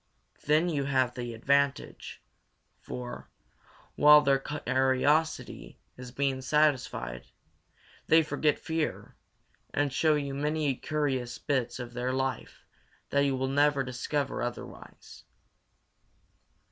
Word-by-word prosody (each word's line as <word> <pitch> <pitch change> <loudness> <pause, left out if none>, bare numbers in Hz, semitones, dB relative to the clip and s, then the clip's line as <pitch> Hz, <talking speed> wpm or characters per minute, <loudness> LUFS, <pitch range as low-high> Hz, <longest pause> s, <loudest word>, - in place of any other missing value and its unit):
Then 155 +3 +3
you 145 -5 -1
have 130 -3 +1
the 120 -2 -5
advantage; 140 +4 -1 0.6
for, 60 -1 -8 0.6
while 150 0 +7
their 140 -2 +2
curiosity 135 - 0 0.2
is 125 -1 -10
being 135 0 -1
satisfied, 130 - 0 0.8
they 160 0 +6
forget 150 -1 0
fear 160 -1 -3 0.6
and 145 -1 0
show 155 +2 +3
you 140 -2 -3
many 150 0 0
curious 135 -5 -2
bits 130 -5 -2
of 120 -1 -7
their 125 +1 -2
life 130 0 -3 0.5
that 140 0 +3
you 135 -1 +1
will 130 0 -1
never 145 0 +2
discover 130 +3 -3
otherwise. 120 0 -8
135 Hz, 110 wpm, -29 LUFS, 125-150 Hz, 0.8 s, while